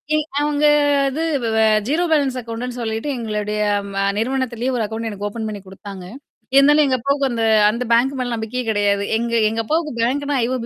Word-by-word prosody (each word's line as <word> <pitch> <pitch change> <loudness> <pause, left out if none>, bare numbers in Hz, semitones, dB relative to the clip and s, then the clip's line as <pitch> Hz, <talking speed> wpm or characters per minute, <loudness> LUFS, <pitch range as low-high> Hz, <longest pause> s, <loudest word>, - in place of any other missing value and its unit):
எ - - +3 0.2
அவங்க 295 0 +1 0.4
அது 300 +5 -4 0.4
வ - - +3 0.3
0 320 +5 +1
பேலன்ஸ் 275 -4 +2
அக்கவுண்ட்ன்னு 240 +1 -6
சொல்லிட்டு 225 +5 -3
எங்களுடைய 210 -2 -3 0.4
வ - - -1 0.2
நிறுவனத்திலேயே 255 +1 -1
ஒரு 230 - 0
அக்கவுண்ட் 225 +1 -4
எனக்கு 205 0 -4
ஓப்பன் 220 0 -5
பண்ணி 205 -2 -7
குடுத்தாங்க. 190 -1 -10 0.5
இருந்தாலும் 295 +2 +6
எங்க 260 -1 +1
அப்பாவுக்கு 280 +2 0
அந்த 230 -1 -1 0.3
அந்த 235 +3 -3
பேங்க் 265 +4 +2
மேல 245 -1 -2
நம்பிக்கையே 225 +3 -4
கிடையாது. 200 -1 +1
எங்க 235 +1 -3 0.2
எங்க 225 +1 -2
அப்பாவுக்கு 310 +1 -1
பேங்க்னா 285 +4 0
IOB 250 -1 -2
235 Hz, 175 wpm, -20 LUFS, 220-275 Hz, 0.5 s, இருந்தாலும்